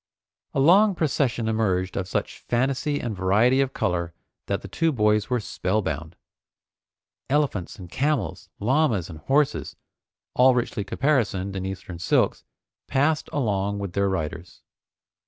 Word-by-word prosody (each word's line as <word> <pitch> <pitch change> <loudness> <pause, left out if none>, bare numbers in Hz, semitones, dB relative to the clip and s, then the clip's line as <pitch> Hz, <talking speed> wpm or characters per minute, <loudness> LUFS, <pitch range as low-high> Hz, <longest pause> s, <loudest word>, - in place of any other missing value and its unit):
A - - +2
long 190 +8 +5
procession 130 -7 0
emerged 95 -5 0
of 95 -2 -2
such - - -3
fantasy 135 +4 0
and 115 -3 -3
variety 105 +8 +3
of 135 -1 0
color 85 -7 -2 0.3
that - - -2
the - - -6
two 165 -1 +1
boys 105 -4 +2
were 125 -1 +1
spellbound. 90 -6 -2 1.1
Elephants 135 - 0
and 90 -3 -9
camels, 135 - -1
llamas 115 - +1
and 80 - -9
horses, 140 - +1 0.6
all 125 0 +5
richly 120 -4 -1
caparisoned 100 -9 0
in 95 0 -3
Eastern 95 -2 -7
silks, 85 - +1 0.4
passed 150 +3 +1
along 100 -6 0
with 100 -3 -5
their 100 0 +1
riders. 85 -1 -4
110 Hz, 135 wpm, -25 LUFS, 95-135 Hz, 1.1 s, long